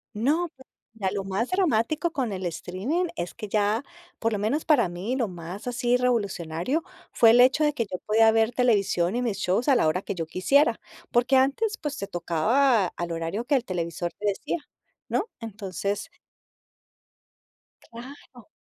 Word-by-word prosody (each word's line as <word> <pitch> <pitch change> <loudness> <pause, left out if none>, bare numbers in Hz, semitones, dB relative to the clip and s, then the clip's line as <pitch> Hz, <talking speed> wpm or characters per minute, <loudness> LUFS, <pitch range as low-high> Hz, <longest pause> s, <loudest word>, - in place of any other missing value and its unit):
No, 300 +11 +1
pues, 265 - -17 0.3
mira, 205 -4 -2
lo 200 -2 -2
más 195 +5 -2
dramático 310 - +1
con 260 -9 -2
el 190 -1 -4
streaming 185 - -2
es 175 0 -4
que 215 -3 -7
ya, 210 +5 +1 0.3
por 225 0 0
lo 205 - -1
menos 265 +9 -1
para 250 - +4
mí, 185 +9 -3
lo 240 -5 0
más 175 +5 -8
así 245 0 +1
revolucionario 215 - 0 0.3
fue 230 - +6
el 235 +2 +6
hecho 260 +5 +5
de 295 0 +2
que 230 -5 -1
yo 185 - -5
podía 220 +1 +5
ver 225 +1 +2
televisión 200 -7 +2
y 245 - 0
mis 230 -5 -1
shows 195 +7 0
a 275 - +6
la 235 - +3
hora 180 +4 +1
que - - -4
yo 165 -4 -4
quisiera, 235 - +2 0.3
porque 245 +3 +3
antes, 290 +12 +1
pues, 295 -3 -4
te 200 - -4
tocaba 210 - +2
al 175 0 -5
horario 165 +8 -3
que 285 +2 +2
el 255 - +1
televisor 175 -3 -3
te 210 - -5
decía, 200 - -1 0.5
¿no? 445 - -1
Entonces 200 - -4 1.8
Claro. 245 0 -12
225 Hz, 175 wpm, -26 LUFS, 190-260 Hz, 1.8 s, fue